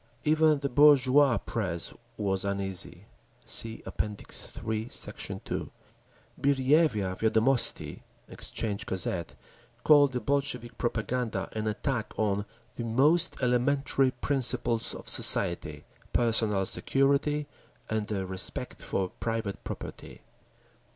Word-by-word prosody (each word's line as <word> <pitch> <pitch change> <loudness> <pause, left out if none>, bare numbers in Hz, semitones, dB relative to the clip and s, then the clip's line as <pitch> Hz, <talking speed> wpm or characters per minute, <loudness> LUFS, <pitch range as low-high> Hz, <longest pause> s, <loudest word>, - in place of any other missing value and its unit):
Even 155 0 +3
the 140 0 -2
bourgeois 140 -1 +5
press 90 -7 -3 0.2
was 95 -2 0
uneasy. 95 -2 -2 0.4
(See 115 0 +2
App. - - -2
III, 110 +2 -4
Sect. - - -3
2) - - -4 0.7
Birjevya 135 - +2
Viedomosti 115 +4 +1 0.3
(Exchange 105 -3 -3
Gazette) 85 -6 -3 0.5
called 145 -3 +5
the 125 - -1
Bolshevik 135 -4 -1
propaganda 115 -3 -2
an 110 0 -3
attack 115 +2 -2
on 100 -1 0 0.3
"the 120 - -3
most 140 +9 +2
elementary 135 +2 +2
principles 125 -3 -1
of - - -10
society—personal 110 -4 +2
security 140 +6 +1 0.4
and 110 -1 -2
the 100 -3 -3
respect 95 0 -3
for 95 -1 -2
private 115 -3 -3
property." - - -8
115 Hz, 100 wpm, -28 LUFS, 105-140 Hz, 0.7 s, bourgeois